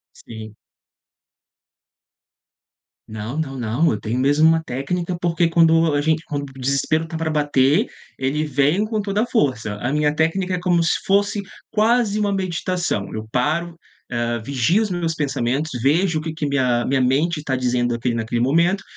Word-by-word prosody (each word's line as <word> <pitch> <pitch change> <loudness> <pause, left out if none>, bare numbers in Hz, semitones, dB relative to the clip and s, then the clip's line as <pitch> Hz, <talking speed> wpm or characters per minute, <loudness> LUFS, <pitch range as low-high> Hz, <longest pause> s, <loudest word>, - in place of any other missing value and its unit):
Sim. 110 -1 -10 2.5
Não, 110 +6 -5
não, 135 -4 -3
não, 120 +7 +1
eu 110 - 0
tenho 115 +3 -2
mesmo 145 +4 +3
uma 165 0 +3
técnica, 170 +6 -3
porque 170 0 +2
quando 165 -1 +4
a 145 - +2
gente 160 +2 0
quando 145 -2 -4
o 135 - -14
desespero 140 +5 0
tá 165 - -7
pra 160 0 -2
bater, 145 -2 +2 0.3
ele 135 +4 0
vem 145 +6 +1
com 215 0 -2
toda 200 +1 -1
a - - +1
força. 130 - 0
A 120 +7 -3
minha 150 -1 +2
técnica 180 +4 0
é - - -3
como 175 -1 +2
se 165 - +1
fosse 200 +1 +2 0.3
quase 220 -1 +2
uma 205 -1 +1
meditação, 180 - -2
eu 110 0 -5
paro 165 +6 -1 0.3
hã, 120 -1 -1
vigio 140 - +1
os 215 - -3
meus 170 -3 -2
pensamentos, 140 0 -1
vejo 160 +5 +2
o - - -6
que 160 0 -5
que 155 -1 -3
minha 130 -4 +1
minha 135 0 +1
mente 145 +6 +1
está 140 -3 -2
dizendo 120 -1 0
aqui 120 +1 -1
naquele 115 +1 -2
momento 170 +9 +2
150 Hz, 170 wpm, -21 LUFS, 130-170 Hz, 2.5 s, quando